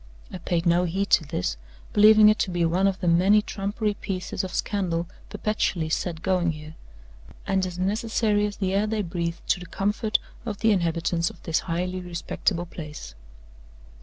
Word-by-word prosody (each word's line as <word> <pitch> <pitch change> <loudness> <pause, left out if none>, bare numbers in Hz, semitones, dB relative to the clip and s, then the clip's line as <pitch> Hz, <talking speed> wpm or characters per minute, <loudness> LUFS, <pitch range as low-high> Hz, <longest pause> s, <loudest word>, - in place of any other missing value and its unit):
I 185 - -5
paid 170 0 -1
no 175 +1 +3
heed 195 +4 -2
to 160 - +5
this, 90 - -2 0.4
believing 215 0 +7
it 215 +1 +4
to - - +1
be 175 -1 +1
one 180 +4 +2
of 195 -1 -1
the 180 - -1
many 185 +5 +5
trumpery 205 +2 -2
pieces 185 -2 -4
of 185 - -4
scandal 175 -5 -1 0.2
perpetually 185 -6 -1
set 165 +1 -2
going 180 -3 +1
here, 155 0 -10 0.7
and 190 -1 +1
as 180 -1 -7
necessary 210 +2 +1
as 205 - -7
the 190 -2 -1
air 205 +2 +2
they 215 -1 -1
breathe 170 -1 -3
to - - +3
the 180 - -9
comfort 210 +5 0 0.3
of 220 -4 -4
the 220 +2 +3
inhabitants 170 -2 +1
of - - -15
this 160 - +1
highly 180 +2 -1
respectable 175 0 -2
place. 150 - -9
185 Hz, 175 wpm, -25 LUFS, 170-205 Hz, 0.7 s, believing